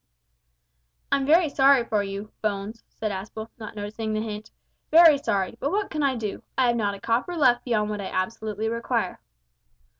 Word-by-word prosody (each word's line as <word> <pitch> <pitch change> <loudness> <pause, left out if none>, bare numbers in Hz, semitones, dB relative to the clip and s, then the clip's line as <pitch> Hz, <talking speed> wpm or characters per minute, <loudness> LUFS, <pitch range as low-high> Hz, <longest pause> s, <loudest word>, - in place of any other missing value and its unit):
"I'm 275 -1 +1
very 330 +2 +5
sorry 275 -3 +4
for 215 -3 +1
you, 200 +1 -6
Bones," 210 +1 -3
said 215 -1 -4
Aspel, 220 +3 -6
not 215 -1 -8
noticing 215 +1 -4
the 215 - 0
hint, 215 -1 -6 0.4
"very 320 -3 +7
sorry, 200 -5 -1
but 280 - -1
what 410 +1 -1
can 305 - -2
I 275 -2 +2
do? 215 -4 -4 0.2
I 260 - +4
have 235 - +2
not 205 -3 0
a - - -11
copper 240 - -1
left 250 -5 +4
beyond 215 -4 0
what 210 -1 -3
I - - -5
absolutely 215 +2 -3
require." 230 -3 -2
225 Hz, 180 wpm, -25 LUFS, 210-265 Hz, 0.4 s, very